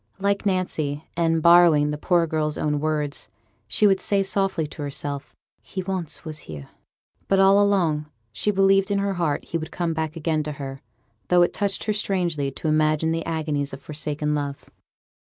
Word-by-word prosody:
Like 200 +1 0
Nancy, 155 -6 -1
and 165 -1 +1
borrowing 170 -4 +6
the 150 - -3
poor 175 +1 +2
girl's 155 -1 -1
own 150 -1 0
words, 150 -1 -2 0.4
she 165 - +2
would 195 -2 +4
say 200 -1 +1
softly 195 -4 0
to 150 - -9
herself, 140 0 -4 0.3
'He 185 - -6
once 180 -4 -4
was 155 -1 -5
here'; 75 -3 -8 0.6
but 195 - +3
all 195 +1 +6
along 165 -7 +1 0.2
she 210 - 0
believed 195 0 +3
in 200 - +1
her 200 0 0
heart 170 -5 -1
he 165 - -3
would 160 - -6
come 170 -2 -2
back 160 0 -3
again 160 -1 0
to 150 0 -4
her, 135 -2 -7 0.5
though 180 -1 +5
it 175 - 0
touched 200 -2 -1
her 215 - 0
strangely 175 -8 0
to 135 +4 -6
imagine 155 +1 +2
the 165 0 -1
agonies 150 -3 -2
of 135 - -8
forsaken 150 0 -3
love. 145 -1 -4
160 Hz, 180 wpm, -24 LUFS, 150-190 Hz, 0.6 s, borrowing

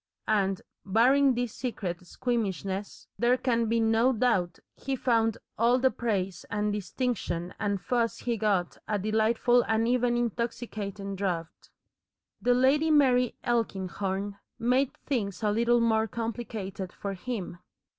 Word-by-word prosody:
And, 195 -3 +1 0.2
barring 255 +6 +4
this 245 -2 -2
secret 185 -8 -4
squeamishness, 200 -4 -3
there 245 +2 +4
can 235 -3 +1
be 230 +1 +2
no 225 +3 +3
doubt 215 -8 +1 0.2
he 270 0 -3
found 230 -3 +1 0.2
all 235 +2 +4
the 260 0 +3
praise 195 -6 -2
and 210 0 0
distinction 200 -4 -2
and 200 -1 0
fuss 235 +2 0
he 240 -1 -1
got 205 -5 0
a 210 - 0
delightful 220 +4 +3
and 225 +1 +2
even 245 0 +2
intoxicating 220 -4 -3
draught. 175 -4 -4 0.7
The 245 0 +3
Lady 275 +5 +3
Mary 255 -5 +4
Elkinghorn 200 -3 -2 0.2
made 250 +3 +2
things 220 -7 -2
a 210 - +3
little 235 +2 +3
more 220 -1 +2
complicated 220 -5 -5
for 200 -1 -5
him. 190 -3 -5
225 Hz, 130 wpm, -28 LUFS, 200-245 Hz, 0.7 s, barring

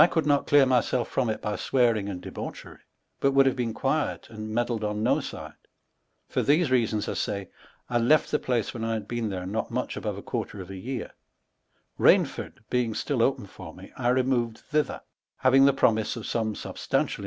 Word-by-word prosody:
could 160 - 0
not 145 -1 +2
cleare 145 -2 +6
myaolfe 125 -1 +2
from 125 - -1
it 110 - -3
by 105 -1 -1
swearing 115 -6 +1
and 90 -2 -6
debaucherie - - -8 0.4
but 140 0 +2
would 135 0 +6
have 135 - +2
beene 120 -3 -1
quiet 145 +6 -1
and 110 -1 -6
meddled 115 0 -1
on 105 0 -1
no - - +3
side; - - -7 0.7
(for - - 0
these 150 0 +3
reasons 115 -4 +2
1 - - -3
say) 100 -2 -3 0.4
1 120 -1 +1
left 155 0 +4
the 150 - +2
place 120 -4 -1
when 115 - -6
1 115 0 -1
had 110 -2 -4
beene 120 -2 -2
there 90 -2 -4
not 105 +4 -2
mucli - - -3
a - - -6
quarter 105 - -4
of 95 0 -8
a - - -6
yeare. 120 +5 -5 0.9
Kainford 110 - +2
being 120 -3 +1
atill - - -2
opeu - - +1
for - - -11
me, - - -13
I 120 - -2
removed 125 -3 +1
thither, 150 -1 -2 0.3
having 135 +1 +5
the 140 - +6
promise 110 -5 +2
of 115 - -6
some 110 -2 -1
substantial! - - -2
120 Hz, 195 wpm, -27 LUFS, 110-130 Hz, 0.9 s, cleare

